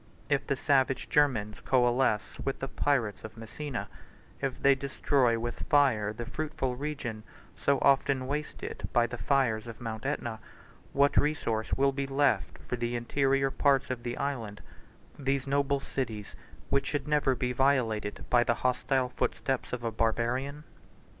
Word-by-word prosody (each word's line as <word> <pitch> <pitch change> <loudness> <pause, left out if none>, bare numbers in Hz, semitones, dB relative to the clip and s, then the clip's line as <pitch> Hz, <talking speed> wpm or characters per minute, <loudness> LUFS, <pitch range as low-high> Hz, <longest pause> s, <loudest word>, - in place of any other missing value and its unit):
If 140 -2 +1
the 140 - +1
savage 135 -1 +1
Germans 115 -8 +2
coalesce 120 -4 +1
with 135 - -1
the 135 - -4
pirates 125 -8 0
of 110 +1 -9
Messina; 120 +3 -5 0.5
if 135 -2 -2
they 140 - +6
destroy 135 -2 +1
with 120 +1 -4
fire 130 -8 +4
the 115 +2 -6
fruitful 155 -3 -3
region, 130 -6 -4 0.3
so 140 0 +2
often 135 -1 +3
wasted 145 +3 -4
by 120 - +4
the 120 0 -6
fires 120 -6 +1
of 115 - -8
Mount 115 +1 -4
Aetna, 120 -6 -3 0.5
133 - - -6
what 140 0 +4
resource 115 -7 -1
will 140 0 +3
be 135 0 -3
left 140 0 +1
for 125 - -2
the 120 0 -2
interior 135 +3 +1
parts 140 -1 +2
of 125 -2 -3
the 120 0 -4
island, 115 -8 -3 0.6
these 135 -1 0
noble 140 0 +1
cities 115 -7 -4 0.4
which 140 - +2
should 145 0 -2
never 145 -3 +2
be 125 0 -1
violated 125 -6 +1
by 120 -1 +6
the 120 - +1
hostile 130 0 +1
footsteps 130 +1 -2
of 125 -1 -4
a 115 - -1
Barbarian? 120 +6 -1
130 Hz, 155 wpm, -29 LUFS, 120-140 Hz, 0.6 s, they